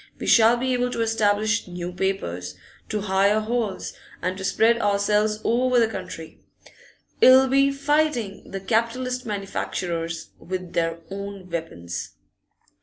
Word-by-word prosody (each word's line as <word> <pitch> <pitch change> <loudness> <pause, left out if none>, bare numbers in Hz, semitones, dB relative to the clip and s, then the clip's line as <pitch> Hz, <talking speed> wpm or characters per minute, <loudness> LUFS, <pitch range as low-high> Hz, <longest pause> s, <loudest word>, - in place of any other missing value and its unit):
We - - -6
shall 230 +1 +6
be 260 +1 0
able 250 0 +1
to - - -2
establish 215 -2 +1
new 175 0 -5
papers, 90 - -3 0.3
to 210 -1 -2
hire 200 +1 +2
halls, 215 -3 -2 0.3
and 185 +1 -2
to 190 - -7
spread 230 +4 +3
ourselves 210 +1 +2
over 250 +2 +2
the 230 - +4
country. 185 -6 -8 0.8
It'll 260 +1 +8
be 275 +1 +3
fighting 280 -7 0
the 195 -1 -5
capitalist 240 +4 -1
manufacturers 175 -5 -3
with 185 -1 -6
their 165 0 0
own 200 -2 -7
weapons. 90 - -5
205 Hz, 130 wpm, -24 LUFS, 185-235 Hz, 0.8 s, It'll